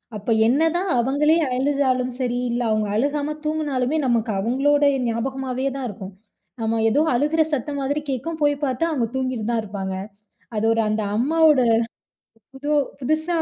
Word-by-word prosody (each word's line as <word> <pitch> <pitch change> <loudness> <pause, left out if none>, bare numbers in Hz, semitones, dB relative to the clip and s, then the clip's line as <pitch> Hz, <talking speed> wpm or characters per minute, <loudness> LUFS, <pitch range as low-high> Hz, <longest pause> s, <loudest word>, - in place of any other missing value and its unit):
அப்போ 210 +2 -3 0.2
என்னதான் 325 +8 +2
அவுங்களே 285 +6 +3 0.2
அழுதாலும் 260 -1 +1
சரி, 245 -1 -1
இல்ல 240 +1 -1
அவுங்க 215 -1 +1
அழுகாம 290 +5 0
தூங்கினாலுமே, 300 -3 0
நமக்கு 230 -2 +1
அவுங்களோட 275 +7 +2 0.2
ஞாபகமாகவே 260 +3 -2
தான் 260 -2 -3
இருக்கும். 195 -1 -8 0.5
நம்ம 225 0 0
ஏதோ 275 +7 +2
அழுகிற 300 +5 +2
சத்தம் 285 +1 -2
மாதிரி 285 +2 -1
கேட்கும், 315 +6 -4
போய் 290 0 +3
பார்த்தா, 260 +4 0
அங்க 240 -5 0
தூங்கிக்கிட்டு 255 -4 -2
தான் 230 -1 +1
இருப்பாங்க. 195 -2 -4 0.6
அது 210 +1 0
ஒரு 225 - +1
அந்த 215 +1 0
அம்மாவோட 305 +4 +4 0.9
புது 270 +2 -8 0.3
புதுசா 310 +6 -1
260 Hz, 145 wpm, -22 LUFS, 230-290 Hz, 0.9 s, அம்மாவோட